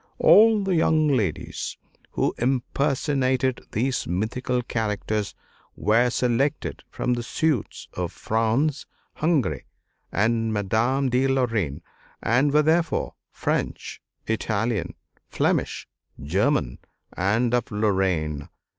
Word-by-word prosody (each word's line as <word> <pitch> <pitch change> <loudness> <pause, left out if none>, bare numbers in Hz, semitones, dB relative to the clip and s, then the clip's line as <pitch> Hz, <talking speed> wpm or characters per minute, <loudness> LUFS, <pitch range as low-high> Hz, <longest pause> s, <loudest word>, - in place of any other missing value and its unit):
All 220 -1 +6
the 195 -1 0
young 160 -2 +3
ladies 110 - -2 0.4
who - - 0
impersonated 130 0 0
these 130 +4 -1
mythical 125 +8 -1
characters 105 -2 -2 0.4
were 115 +4 +3
selected 125 +4 0
from 125 - -1
the 120 - -2
suites 145 +1 -1
of 90 -2 -3
France, 115 +7 0 0.3
Hungary, 140 - 0 0.4
and 115 +2 +1
Madame 115 +7 +1
de 125 +2 +2
Lorraine; 115 - 0 0.4
and 130 +5 +2
were 150 +1 +4
therefore 165 +2 +1 0.2
French, - - -3 0.2
Italian, 110 0 -1 0.3
Flemish, - - -1 0.3
German, 95 - 0 0.4
and 110 +6 +1
of 125 -2 +1
Lorraine. 95 -8 0
120 Hz, 100 wpm, -24 LUFS, 105-135 Hz, 0.4 s, All